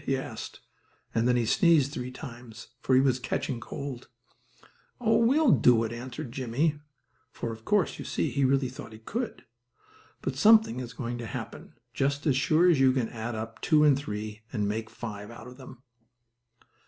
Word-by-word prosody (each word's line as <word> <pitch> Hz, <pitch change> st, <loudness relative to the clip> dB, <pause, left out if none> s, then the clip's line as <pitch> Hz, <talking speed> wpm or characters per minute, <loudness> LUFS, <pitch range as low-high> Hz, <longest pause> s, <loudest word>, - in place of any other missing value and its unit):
he 135 Hz, -2 st, 0 dB
asked, 130 Hz, -, -7 dB, 0.5 s
and 115 Hz, +1 st, +2 dB
then 125 Hz, -, +3 dB
he 120 Hz, -2 st, +1 dB
sneezed 150 Hz, +2 st, +4 dB
three 125 Hz, -3 st, -5 dB
times, 125 Hz, -4 st, -10 dB
for 130 Hz, -, +2 dB
he -, -, +7 dB
was 130 Hz, -2 st, +2 dB
catching 125 Hz, 0 st, -2 dB
cold. 130 Hz, +2 st, -7 dB, 0.9 s
"Oh, 225 Hz, -2 st, +3 dB
we 235 Hz, +5 st, +4 dB
will 310 Hz, -7 st, +5 dB
do 120 Hz, -2 st, +5 dB
it," 115 Hz, -, -3 dB
answered 120 Hz, 0 st, -7 dB
Jimmie, 135 Hz, +5 st, -1 dB, 0.5 s
for, 115 Hz, -, -5 dB
of 110 Hz, 0 st, -10 dB
course, 205 Hz, -5 st, +1 dB
you -, -, -5 dB
see, -, -, -1 dB
he 140 Hz, -, 0 dB
really 135 Hz, 0 st, +3 dB
thought 125 Hz, -3 st, -9 dB
he -, -, -10 dB
could. 225 Hz, -, -5 dB, 0.8 s
But 135 Hz, -, -2 dB
something 215 Hz, -, +5 dB
is 125 Hz, -1 st, -6 dB
going 120 Hz, -1 st, -4 dB
to 115 Hz, -, -5 dB
happen, -, -, -7 dB, 0.2 s
just 140 Hz, +1 st, -1 dB
as 145 Hz, -4 st, +3 dB
sure 155 Hz, +6 st, +3 dB
as 170 Hz, -6 st, +4 dB
you 130 Hz, -1 st, +5 dB
can 125 Hz, -4 st, 0 dB
add 115 Hz, 0 st, -5 dB
up 115 Hz, +1 st, -6 dB
two 155 Hz, -2 st, +4 dB
and 145 Hz, -2 st, +6 dB
three 105 Hz, -5 st, -5 dB
and 105 Hz, -4 st, -1 dB
make 110 Hz, +1 st, -3 dB
five 105 Hz, -3 st, -7 dB
out 115 Hz, 0 st, -11 dB
of 125 Hz, 0 st, -11 dB
them. 130 Hz, -1 st, -13 dB
130 Hz, 190 wpm, -28 LUFS, 115-140 Hz, 0.9 s, he